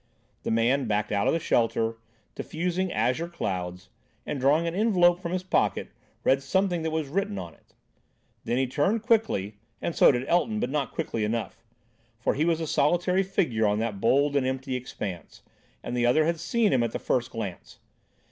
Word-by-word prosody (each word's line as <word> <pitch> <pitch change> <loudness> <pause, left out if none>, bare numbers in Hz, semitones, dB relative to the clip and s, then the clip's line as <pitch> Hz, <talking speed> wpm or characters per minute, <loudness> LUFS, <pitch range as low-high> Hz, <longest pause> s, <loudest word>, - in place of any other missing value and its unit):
The - - -4
man 120 +4 +2
backed 105 0 0
out 100 -1 +1
of - - +3
the 165 - +1
shelter, 115 -6 +1 0.4
diffusing 180 +3 -2
azure 130 +7 0
clouds, 90 - -4 0.4
and, 145 - -3
drawing 145 +6 +3
an 165 - -2
envelope 180 -4 +3
from 170 -2 -5
his 185 0 -2
pocket, 185 - 0 0.3
read 135 +1 +3
something 180 +4 0
that 160 - -1
was 160 -2 -2
written 195 +7 -2
on 85 - -6
it. - - -28 0.7
Then 120 - -1
he 135 - +2
turned 170 - 0
quickly—and 115 - -1
so - - +7
did 125 0 -2
Elton, 210 +5 +1
but - - -2
not 140 -4 -1
quickly 110 - -3
enough. 115 +1 -3 0.5
For 115 - 0
he 150 +3 0
was 165 -1 +1
a 165 - -2
solitary 175 +5 +2
figure 170 - +1
on 105 0 +1
that 110 -3 -3
bald 140 +4 +3
and 140 - +3
empty 130 0 -2
expanse, 100 -9 -6 0.4
and 120 - -4
the 120 0 +2
other 155 +6 +4
had 170 0 0
seen 215 +5 +1
him 130 - +3
at 115 -1 -1
the - - -1
first 120 -2 -1
glance. 105 -6 -7
140 Hz, 185 wpm, -27 LUFS, 115-175 Hz, 0.7 s, so